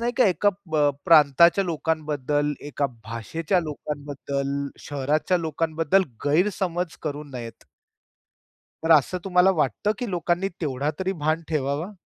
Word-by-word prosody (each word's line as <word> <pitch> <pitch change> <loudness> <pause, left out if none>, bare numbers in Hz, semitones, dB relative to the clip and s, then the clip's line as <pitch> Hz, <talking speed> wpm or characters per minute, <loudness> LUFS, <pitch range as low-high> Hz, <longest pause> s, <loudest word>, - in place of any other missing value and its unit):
नाही 240 +1 0
का 255 - +5
एका 195 +2 +2 0.2
ब 155 - 0 0.3
प्रांताच्या 165 +4 +6
लोकांबद्दल, 150 -3 -1
एका 145 -1 -2 0.2
भाषेच्या 155 - -2
लोकांबद्दल, 140 -2 -4
शहराच्या 145 +5 0
लोकांबद्दल 165 +2 +1 0.2
गैरसमज 180 +2 0
करू 150 -1 -4
नयेत. 120 -2 -8 1.2
तर 165 - +2
असं 155 +3 +4
तुम्हाला 185 0 +4
वाटतं 155 - 0
की 245 - -3
लोकांनी 175 +1 0
तेवढा 140 -2 -1
तरी 190 0 0
भान 155 +2 +1
ठेवावा? 150 +4 -1
155 Hz, 120 wpm, -24 LUFS, 145-175 Hz, 1.2 s, प्रांताच्या